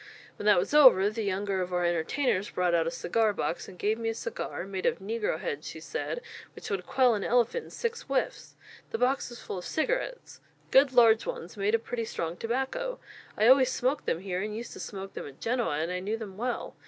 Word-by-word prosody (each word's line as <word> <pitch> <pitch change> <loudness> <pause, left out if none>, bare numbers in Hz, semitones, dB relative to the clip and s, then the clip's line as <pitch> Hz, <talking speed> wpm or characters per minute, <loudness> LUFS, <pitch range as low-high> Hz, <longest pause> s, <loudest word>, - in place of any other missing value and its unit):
When - - -3
that - - +7
was 460 -10 0
over, 250 -9 +7
the 225 +1 -4
younger 200 -1 -1
of 180 0 -3
our 180 -1 +1
entertainers 185 - 0
brought 180 -1 0
out 165 -1 +2
a - - +2
cigar 210 +6 +1
box, 175 - -3
and 185 - -12
gave 215 +4 0
me 225 -1 -1
a 225 - -2
cigar, 485 - -4
made 190 -1 -3
of - - +1
negrohead 190 -7 -3
she 160 - -7
said, 325 - -4 0.3
which - - -8
would 185 -3 -2
quell 255 -3 +4
an 205 -2 -1
elephant 245 - +1
in - - -13
six 465 -1 -3
whiffs. - - -2 0.3
The - - -2
box 250 +3 +1
was 240 0 -10
full 185 - -5
of - - -9
cigarettes - - -2 0.3
good 270 0 +6
large 230 -3 +5
ones, 170 - -5
made 205 +2 +2
of 230 - -2
pretty 235 -2 -3
strong 165 -5 -3
tobacco; 265 - -2 0.4
I 215 - +3
always 260 +1 +6
smoke 260 +3 0
them 165 - -1
here, 185 -1 -3
and 210 +1 -3
used 235 +1 -7
to - - -10
smoke 195 -1 -7
them - - -6
at 140 -1 -13
Genoa, 235 -10 0
and 160 +3 -1
I 180 - -2
knew 205 +4 -2
them 210 -4 -8
well. 240 +4 -3
220 Hz, 225 wpm, -29 LUFS, 185-250 Hz, 0.4 s, that